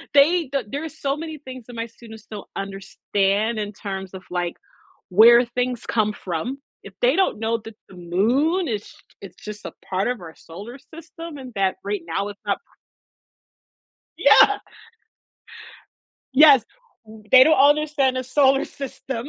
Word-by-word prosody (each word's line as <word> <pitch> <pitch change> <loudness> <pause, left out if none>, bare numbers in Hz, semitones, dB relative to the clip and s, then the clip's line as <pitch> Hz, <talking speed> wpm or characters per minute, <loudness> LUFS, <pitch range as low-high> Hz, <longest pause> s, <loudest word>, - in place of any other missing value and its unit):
they 320 +3 +5
th 270 -2 -2
there's 315 +4 -6
so 275 -1 -1
many 315 -1 -6
things 260 -4 -10
that 245 - -10
my 230 0 -3
students 220 -1 -14
don't 210 -2 -9
understand 195 +2 -1
in 205 -1 -3
terms 195 -2 -6
of, 190 - -8
like, 175 -1 -2 0.6
where 230 +5 +7
things 245 0 -3
come 215 -2 +1
from, 210 - -4 0.2
if 200 - -12
they 250 +4 +4
don't 380 - +1
know 225 +1 0
that 225 -1 -12
the 190 - -14
moon 245 - +1
is 210 -3 -4 0.3
it's 195 - -13
just 210 0 -8
a - - -6 0.2
part 190 +1 0
of 245 -4 -3
our 165 -2 -11
solar 205 +10 -11 0.2
system 330 -1 -9
and 255 -2 -9
that 195 -1 0
right 200 -3 -3
now 195 +5 -2
it's 205 -1 -10
not - - 0
p - - -46 1.5
Yeah. 410 0 +6 1.8
Yes, 280 -4 +7 0.4
w 215 0 -13
they 260 0 +9
don't 315 +2 +4
understand 290 -3 +1
the 255 - -2
solar 270 +1 +3
system. 265 -2 -7
235 Hz, 160 wpm, -22 LUFS, 200-275 Hz, 1.8 s, they